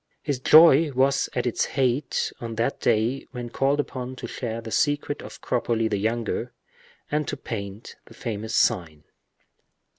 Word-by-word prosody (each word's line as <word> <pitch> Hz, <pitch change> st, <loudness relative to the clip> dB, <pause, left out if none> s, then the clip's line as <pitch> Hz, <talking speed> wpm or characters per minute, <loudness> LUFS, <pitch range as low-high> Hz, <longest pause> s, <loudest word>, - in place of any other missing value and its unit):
His 145 Hz, -4 st, -2 dB
joy 155 Hz, +1 st, +7 dB
was 135 Hz, +1 st, +2 dB
at 125 Hz, -, 0 dB
its 120 Hz, -, +1 dB
height 130 Hz, +1 st, 0 dB
on 115 Hz, -1 st, -5 dB
that 115 Hz, +5 st, -1 dB
day 115 Hz, +5 st, +1 dB
when 120 Hz, -2 st, -6 dB
called 140 Hz, +3 st, +1 dB
upon 130 Hz, -3 st, -4 dB
to -, -, -7 dB
share 115 Hz, -2 st, -4 dB
the 115 Hz, -1 st, -8 dB
secret 145 Hz, +1 st, 0 dB
of -, -, -11 dB
Cropoli 115 Hz, -2 st, 0 dB
the 105 Hz, -2 st, -1 dB
younger, 115 Hz, +2 st, -2 dB, 0.6 s
and 150 Hz, 0 st, 0 dB
to 145 Hz, -, -3 dB
paint 100 Hz, -3 st, -7 dB
the -, -, -16 dB
famous 110 Hz, -1 st, -4 dB
sign. 80 Hz, -4 st, +1 dB
125 Hz, 155 wpm, -25 LUFS, 110-135 Hz, 0.6 s, joy